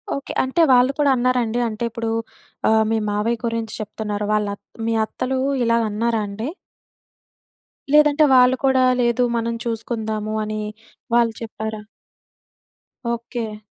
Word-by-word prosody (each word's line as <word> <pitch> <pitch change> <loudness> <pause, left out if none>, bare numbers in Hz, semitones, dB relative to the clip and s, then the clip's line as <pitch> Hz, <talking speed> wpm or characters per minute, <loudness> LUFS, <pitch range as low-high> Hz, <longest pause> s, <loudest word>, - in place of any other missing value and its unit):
Okay. 275 - -6
అంటే 265 +6 +1
వాళ్ళు 250 +2 +5
కూడా 290 -1 +4
అన్నారండి? 245 -2 +1
అంటే 215 +1 -5
ఇప్పుడు 230 0 -4 0.6
ఆహ్, 220 0 +4
మీ 225 - +2
మావయ్య 215 +3 0
గురించి 230 -1 -2
చెప్తున్నారు. 210 -1 -4
వాళ్ళత్ 205 -1 -1 0.2
మీ 230 - +1
అత్తలూ 260 +4 -3 0.2
ఇలాగన్నారండి? 225 -1 0 1.5
లేదంటే 300 0 +6
వాళ్ళు 250 0 +6
కూడా 260 -1 +4 0.2
"లేదు, 240 +1 +2 0.2
మనం 230 0 -1
చూసుకుందాము." 220 -2 -3
అని 215 0 -3 0.5
వాళ్ళు 235 -1 +3
చెప్పారా? 220 -1 -5 1.3
ఓకే. 235 -2 -5
230 Hz, 115 wpm, -21 LUFS, 215-245 Hz, 1.5 s, లేదంటే